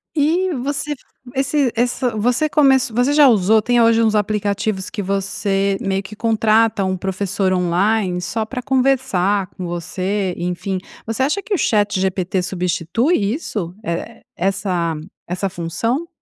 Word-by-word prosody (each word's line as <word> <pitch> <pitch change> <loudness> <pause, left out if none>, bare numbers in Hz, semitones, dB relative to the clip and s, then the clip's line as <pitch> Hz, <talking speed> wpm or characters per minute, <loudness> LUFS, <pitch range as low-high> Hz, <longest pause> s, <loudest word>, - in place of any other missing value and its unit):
E 335 +5 +2
você 285 +2 -2
f 290 - -3 0.4
esse 270 -1 +1
ess 245 +2 0 0.2
você 245 +7 +1
comec 265 -5 +4
você 245 +5 +2
já 290 -1 +6
usou 215 -2 +4
tem 240 +2 +2
hoje 230 0 +4
uns 220 -1 +2
aplicativos 205 -1 -1
que 205 - -4
você 195 0 0
meio 195 0 0
que 200 +2 -10
contrata 220 -2 +2
um 185 0 0
professor 190 +1 -1
online 180 +1 +1
só 215 +5 -2
pra 250 +2 -5
conversar 245 -8 +1
com 180 - -8
você, 185 +3 -2
enfim. 180 +2 -2 0.3
Você 225 +4 -1
acha 305 +9 0
que 420 - -3
o - - +2
ChatGPT 190 - +1
substitui 180 - 0 0.2
isso? 200 - -4
Eh, 170 -3 -4 0.2
essa 180 -3 0 0.3
essa 185 +2 -2
função 225 - -2
205 Hz, 145 wpm, -19 LUFS, 185-245 Hz, 0.4 s, já